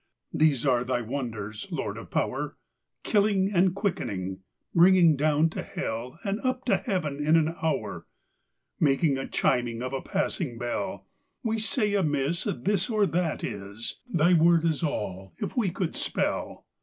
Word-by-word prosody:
These 150 -4 +3
are 125 -3 +3
thy 125 -1 -1
wonders, 110 -4 -5
Lord - - -3
of - - -9
power, - - -2 0.5
Killing 200 -2 +2
and 180 0 +3
quickning, 95 - -2 0.3
bringing 175 -2 +6
down 155 +2 +2
to - - -4
hellAnd 170 - -4
up 255 0 -1
to 205 -6 +3
heaven 155 - -2
in 155 +2 +4
an 160 -1 +4
houre; 130 -10 -2 0.7
Making 140 -1 +3
a 135 - -4
chiming 120 -1 0
of 130 +1 -4
a 135 - -2
passing 170 -9 -2
bell. 120 +11 -3 0.4
We 225 -1 0
say 215 -1 0
amisseThis 170 - 0
or 215 -3 +3
that 175 -3 -1
is:Thy 115 - -1
word 170 0 +5
is 160 -3 +1
all, 95 - -3
if - - -4
we 230 -7 +2
could 175 0 -3
spell. - - -2
155 Hz, 145 wpm, -27 LUFS, 125-190 Hz, 0.7 s, bringing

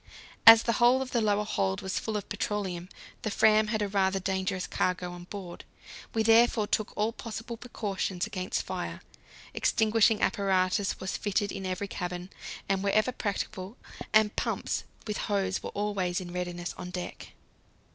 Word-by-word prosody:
As 225 0 +11
the 230 - +1
whole 250 +2 +5
of 255 - -9
the 235 - +2
lower 210 -1 +2
hold 95 - -1
was 190 - -1
full 220 -1 -2
of 205 - -6
petroleum, 190 -5 -3 0.3
the 220 - -2
Fram 215 +1 +4
had 215 -1 0
a - - 0
rather 195 -1 +1
dangerous 190 0 -1
cargo 180 -1 -1
on 175 0 -9
board. 185 -2 -8 0.5
We 220 - +3
therefore 225 0 +5
took 215 0 -1
all 215 +2 +1
possible 230 +1 -6
precautions 200 -6 -3
against 185 -4 -2
fire; - - -5 0.5
extinguishing 220 -1 +3
apparatus 190 0 +1
was 190 - -3
fitted 205 -1 0
in 195 -1 -4
every 185 +2 -2
cabin 180 0 -5 0.4
and 195 -1 +1
wherever 215 +4 +2
practicable, 205 -1 -4 0.3
and 215 0 +4
pumps - - -2 0.2
with 210 -2 -3
hose 195 -2 -1
were - - -5
always 200 -3 -1
in 175 -2 -7
readiness 175 -1 -4
on 180 - -6
deck. 180 0 -7
200 Hz, 160 wpm, -29 LUFS, 185-215 Hz, 0.5 s, As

